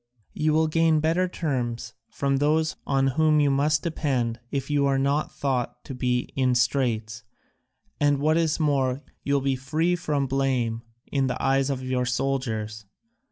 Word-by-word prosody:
You 155 0 +1
will 160 +1 +3
gain 160 0 +3
better 165 +4 +1
terms 120 -9 -3 0.2
from 140 -1 0
those 155 +3 +1
on 135 -1 +2
whom 155 +3 +3
you 145 -1 +3
must 145 +2 +2
depend 130 -8 -1
if 135 0 -3
you 145 -1 +2
are 135 -1 +2
not 140 +3 0
thought 125 -3 -2
to - - -6
be 125 -1 -1
in 130 -2 +2
straits, 120 -3 0 0.8
and, 145 -1 +3
what 155 +3 +2
is 165 -1 +1
more, 140 -3 +1 0.2
you 140 - +1
will 140 - +2
be 135 0 +1
free 155 +7 0
from 150 -5 -1
blame 130 -4 0 0.3
in 135 -2 +1
the 125 - -3
eyes 135 0 +2
of 130 -2 -2
your 130 -1 -1
soldiers. 115 -5 -2
135 Hz, 165 wpm, -25 LUFS, 125-150 Hz, 0.8 s, will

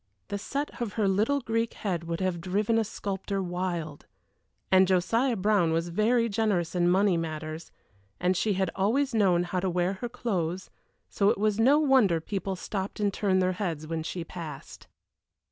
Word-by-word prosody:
The 200 - -3
set 280 +4 -4
of 225 -4 -2
her 215 -3 +1
little 215 +9 +2
Greek 230 -1 -1
head 175 -5 -3
would 170 +2 -3
have 185 -2 -1
driven 205 +5 +1
a - - +2
sculptor 195 -1 -4
wild 175 -4 -4 0.6
and 190 0 +6
Josiah 225 +8 +2
Brown 195 -4 +2
was 165 +1 -1
very 230 +6 +2
generous 200 -6 0
in 175 -1 +2
money 190 0 +3
matters, 155 0 -5 0.5
and 180 +1 +2
she 210 +3 +1
had 190 0 0
always 240 +8 +1
known 185 -6 +3
how 180 +1 -2
to 190 +1 -1
wear 180 +1 0
her 240 - -3
clothes, 185 -7 -3 0.4
so 200 0 +2
it - - +1
was 210 +1 +1
no 265 +6 +5
wonder 260 - +4
people 195 +2 -3
stopped 190 +2 -5
and 205 -2 +1
turned 190 -2 +1
their 185 - +2
heads 165 -6 -2
when 160 0 -3
she 170 +2 -4
passed. 160 -4 -9
190 Hz, 180 wpm, -28 LUFS, 175-215 Hz, 0.6 s, and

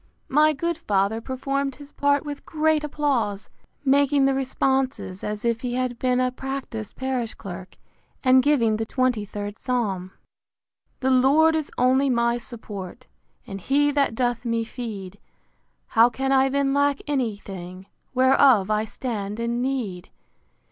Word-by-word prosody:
My 305 +3 +5
good 335 +3 -2
father 205 -3 0
performed 275 +2 -2
his 285 +1 -13
part 285 +1 +1
with 290 -1 -6
great 315 -1 +1
applause, 265 -9 -1 0.3
making 280 0 +4
the 270 - +3
responses, 265 -6 -1
as 210 +1 -4
if 230 -1 0
he 245 -1 -3
had 250 -2 -2
been 250 -1 +1
a 255 0 +1
practised 255 -5 -6
parish 260 -3 -3
clerk; 190 -2 -9 0.5
and 260 0 +6
giving 240 -6 +2
the 225 - -2
xxiiid 210 -5 -2
psalm, 200 -8 -2 0.9
[The 265 0 +2
Lord 285 +5 +5
is 310 -2 -2
only 260 +2 +3
my 235 -1 +1
support, 225 -2 -8 0.4
And 195 -1 -7
he 290 +6 +2
that 280 -5 +1
doth 245 -1 0
me 230 -1 0
feed: 210 -5 -7 0.7
How 230 +2 +5
can 270 +2 -2
I 270 0 +4
then 275 0 +1
lack 285 0 +2
any 260 -7 -1
thing 185 -2 -9 0.3
Whereof 260 -5 +5
I 215 +1 +1
stand 215 -3 -4
in 235 +1 -1
need? 235 -9 -3
255 Hz, 145 wpm, -24 LUFS, 215-275 Hz, 0.9 s, and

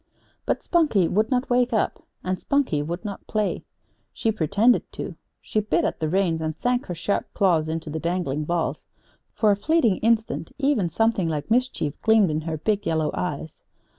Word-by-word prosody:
But - - 0
Spunkie 295 - +3
would 215 +5 +1
not 255 0 0
wake 245 0 +3
up, 220 - 0 0.2
and 185 0 -2
Spunkie 280 - +1
would 170 +7 -5
not 200 -2 -6
play. 215 -2 -1 0.5
She 225 - 0
pretended 215 +6 +2
to. - - -5 0.3
She 215 - -1
bit 210 - +1
at - - -2
the 155 - -1
reins, 175 -2 +1
and 155 -1 -2
sank 245 0 0
her 175 - -4
sharp 185 +5 -2
claws 165 -5 +2
into 160 -1 -4
the 160 - -3
dangling 170 -4 -1
balls. 170 +1 -2 0.5
For 215 -2 +3
a - - +3
fleeting 240 - +2
instant, 225 -6 0
even, 270 - +1
something 225 -3 +1
like 150 +3 -3
mischief 245 - 0
gleamed 220 -6 +4
in 155 +1 -1
her 160 0 -3
big 205 +5 -1
yellow 160 -1 +1
eyes. 160 -2 -4
195 Hz, 180 wpm, -24 LUFS, 160-225 Hz, 0.5 s, gleamed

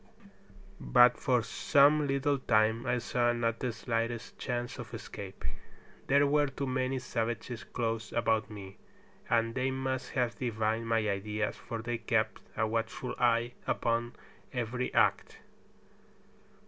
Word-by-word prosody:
But 120 - +6
for 125 -4 +2
some 145 +4 +4
little 140 +1 +1
time 110 0 +2
I 125 0 +2
saw 120 0 +1
not 115 -1 -1
the 125 - -1
slightest 115 +1 -3
chance 120 -1 -3
of - - -7
escape. 95 -1 -8 0.6
There 140 +1 +5
were 145 +1 +3
too 135 +1 -4
many 130 0 0
savages 120 -1 -3
close 115 -2 -3
about 110 -2 +1
me, 100 -2 -9 0.5
and 115 0 +2
they 130 +1 0
must 130 0 -3
have 120 -4 0
divined 110 -1 -1
my 115 -2 +2
ideas, 105 +2 -1
for 115 -1 -6
they 120 0 -2
kept - - 0 0.2
a 110 - +2
watchful 115 +3 -2
eye 120 0 +2
upon 120 0 0 0.4
every 125 0 -2
act. - - +2
120 Hz, 135 wpm, -31 LUFS, 115-130 Hz, 0.6 s, But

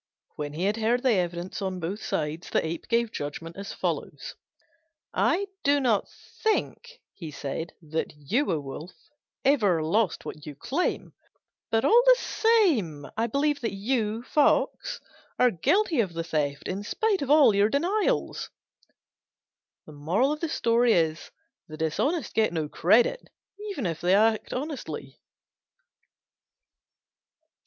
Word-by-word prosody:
When 145 -1 -5
he 165 +4 -3
had 205 +3 +1
heard 235 +3 +1
the 260 - +4
evidence 175 0 -2
on 190 -1 -3
both 180 +5 -4
sides, 155 +2 -3
the - - +1
Ape 160 +1 -5
gave 235 -1 +1
judgment 165 -1 -6
as 200 0 -6
follows: - - -4 0.8
"I 385 +4 +2 0.2
do 285 +1 +4
not 235 -7 +1 0.3
think," 480 +2 -1
he 165 -5 -8
said, 150 +3 -5
"that 160 +1 -3
you, 220 - 0
O 160 - 0
Wolf, 150 +5 -8 0.5
ever 205 - +3
lost 200 +5 0
what 150 - -8
you 150 - -7
claim; 285 - -2 0.6
but 225 0 +1
all 470 +2 +6
the - - +9
same 315 - +2
I 225 +1 0
believe 285 +4 0
that 230 - -2
you, 220 +1 -1
Fox, 295 +3 +1 0.4
are 250 -1 +4
guilty 330 - +1
of 190 -6 -3
the 165 - -2
theft, 150 -4 -2
in 190 +2 -3
spite 415 - 0
of 275 - -3
all 295 -6 +6
your 200 +1 +3
denials." 395 - 0 1.4
The 230 - 0
dishonest 260 - -1
get 220 -3 +2
no 160 -3 -2
credit, 225 - +2 0.4
even 285 - -4
if 165 -3 -3
they 180 +2 +4
act 220 +1 +2
honestly. 285 +2 -5
215 Hz, 130 wpm, -27 LUFS, -, 1.4 s, the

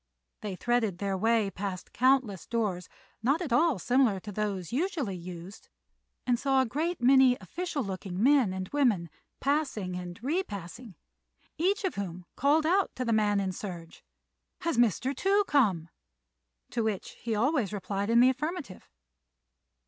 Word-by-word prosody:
They 205 -3 -4
threaded 225 -3 0
their 195 0 -1
way 220 0 +2
past 190 -2 -5
countless 255 -7 +2
doors, 205 -6 -2 0.3
not 275 +8 +2
at 320 -9 -2
all 315 0 +3
similar 245 0 +2
to 210 - -7
those 200 -4 -3
usually 290 - -1
used, 180 +2 -9 0.6
and 245 -2 +2
saw 270 -1 +2
a 260 - +3
great 320 +9 -2
many 260 0 +6
official 305 - -4
looking 190 -1 -4
men 265 -6 +5
and 185 0 -4
women 220 - +1 0.3
passing 270 -11 -1
and 180 0 -7
repassing, 225 - -4 0.6
each 395 +5 +1
of 375 - 0
whom 180 -3 -5
called 300 +3 +3
out 375 +4 +3
to 255 - -3
the 230 - +1
man 210 -2 +2
in 190 -1 -1
serge, 175 -3 -8 0.6
"Has 335 - 0
Mr. 240 +3 +2
Tou 400 +7 +3
come?" 210 - +2 0.8
to 235 - -1
which 215 -4 -2
he 230 -2 -1
always 245 - +1
replied 200 0 -3
in 235 +1 +5
the 255 - +7
affirmative. 300 - -5
230 Hz, 150 wpm, -29 LUFS, 190-275 Hz, 0.8 s, the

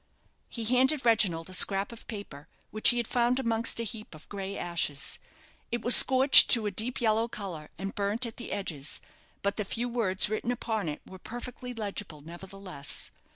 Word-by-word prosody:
He 230 - -7
handed 260 +4 +1
Reginald 195 -8 +1
a - - -11
scrap 195 +2 +4
of 235 - -15
paper, 180 -9 -10 0.2
which 215 - +2
he 240 - +1
had 235 -2 -3
found 245 0 0
amongst 230 -3 -1
a - - -3
heap 220 -5 -9
of 155 - -17
grey 195 -1 -7
ashes. 165 -5 -3 0.5
It 235 -1 -4
was 245 - +7
scorched 265 +1 +9
to 230 -3 +3
a 205 - -3
deep 225 +6 -2
yellow 225 -1 0
colour, 185 -9 -9
and 195 +1 -7
burnt 205 +4 -1
at 230 - -9
the 245 - -9
edges; 160 -8 -4 0.4
but 200 0 -3
the 210 - -2
few 235 +5 -5
words 225 -6 0
written 215 +3 -4
upon 220 -7 -4
it 150 - -8
were 190 - -14
perfectly 245 +3 -10
legible, 200 -7 -6
nevertheless. 180 -1 -2
215 Hz, 185 wpm, -27 LUFS, 190-235 Hz, 0.5 s, scorched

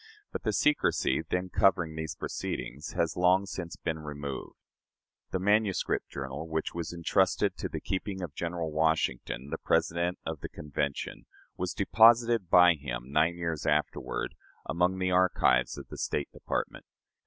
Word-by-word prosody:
But - - -4
the - - 0
secrecy 145 - +2
then 90 +3 -2
covering 90 -5 +2
those 80 0 -4
proceedings 70 +5 -5
has 80 -2 0
long 90 +2 +4
since 85 -3 -6
been 80 -2 -3
removed. 70 -3 -6 0.7
The - - -1
manuscript 105 +1 +1
journal, 70 +3 -5
which 80 -1 -2
was 85 -2 -4
intrusted 90 +2 +1
to - - -3
the - - -4
keeping 95 0 -3
of 80 -5 -5
General 85 0 -3
Washington, 75 -4 0
President 85 +1 +1
of 80 -2 -4
the - - -6
Convention, 70 -1 -4 0.3
was 90 -2 -3
deposited 115 -1 +5
by 90 -1 +7
him, 65 -4 -6
nine 80 +3 +3
years 85 -3 -3
afterward, 75 +1 -1 0.3
among 90 +2 +1
the 95 -1 0
archives 90 -9 +3
of - - -9
the - - -8
State 70 - -2
Department. - - -4
85 Hz, 145 wpm, -29 LUFS, 75-90 Hz, 0.7 s, by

